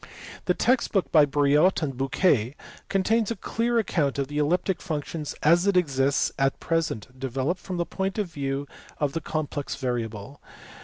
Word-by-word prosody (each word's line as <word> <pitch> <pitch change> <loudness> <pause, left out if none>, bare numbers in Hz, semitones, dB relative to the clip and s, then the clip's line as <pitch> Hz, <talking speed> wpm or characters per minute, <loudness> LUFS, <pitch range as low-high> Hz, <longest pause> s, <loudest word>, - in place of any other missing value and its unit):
The - - +2
text 255 0 +2
book 195 -3 +1
by 150 -3 +6
Briot 145 +5 +3
and 135 -3 -2
Bouquet 135 - +1 0.3
contains 215 +3 +2
a 230 - -1
clear 235 +2 -1
account 155 -10 +1
of 140 0 -2
elliptic 170 +5 0
functions 155 -2 -4
as 170 +5 +4
it 200 -2 +3
exists 140 -5 +2
at 135 0 +1
present, 130 -7 -2
developed 135 +7 -2
from 185 -2 -5
the 170 - 0
point 190 +3 -3
of 210 - +1
view 140 -4 -3 0.3
of 145 -2 -1
the 165 - -2
complex 145 -2 -3
variable. 120 -1 -4
150 Hz, 160 wpm, -26 LUFS, 135-185 Hz, 0.3 s, by